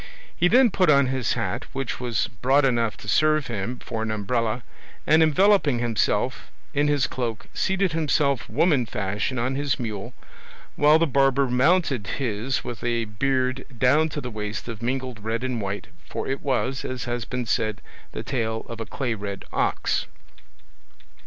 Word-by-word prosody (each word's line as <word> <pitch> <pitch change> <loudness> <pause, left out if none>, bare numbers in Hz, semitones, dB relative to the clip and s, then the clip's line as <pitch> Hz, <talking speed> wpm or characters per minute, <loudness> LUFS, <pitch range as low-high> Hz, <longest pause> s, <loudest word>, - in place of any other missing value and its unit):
He 175 - +3
then 245 +3 +5
put 185 -3 +2
on 140 -2 +6
his 130 -2 0
hat, - - -2
which 135 -2 -3
was 120 -5 0
broad 135 +3 +4
enough 120 -4 +1
to - - -12
serve 155 +4 +3
him 120 0 -3
for 115 -2 -5
an 110 - -2
umbrella, 110 +2 -1 0.4
and 155 +1 +5
enveloping 160 -3 +4
himself 120 -3 0 0.2
in 145 +1 +2
his 145 -3 +2
cloak 115 -4 -3
seated 190 -1 +1
himself 145 -5 +1
woman 135 -1 +2
fashion 105 +6 -2
on 120 +3 0
his 140 0 -1
mule, 115 0 -5 0.6
while 150 +1 +6
the 165 - +3
barber 135 -1 +3
mounted 130 - +2
his 125 0 -1
with 120 - -6
a 120 -1 0
beard 130 +4 0
down 145 +7 +4
to 150 - -4
the 125 -3 -5
waist 105 +1 -5
of 115 -3 -6
mingled 125 -2 -3
red 115 +2 -2
and 125 -3 -2
white, 100 +1 -4 0.2
for - - -4
it 135 +1 -2
was, 135 -1 -1
as 130 -1 -4
has 120 -1 -2
been 125 +3 -3
said, 110 -3 0 0.3
the - - -5
tail 110 -4 -2
of 115 0 -7
a 115 - -5
clay 125 +2 -2
red 100 -2 -6
ox. - - 0
125 Hz, 170 wpm, -24 LUFS, 115-140 Hz, 0.6 s, on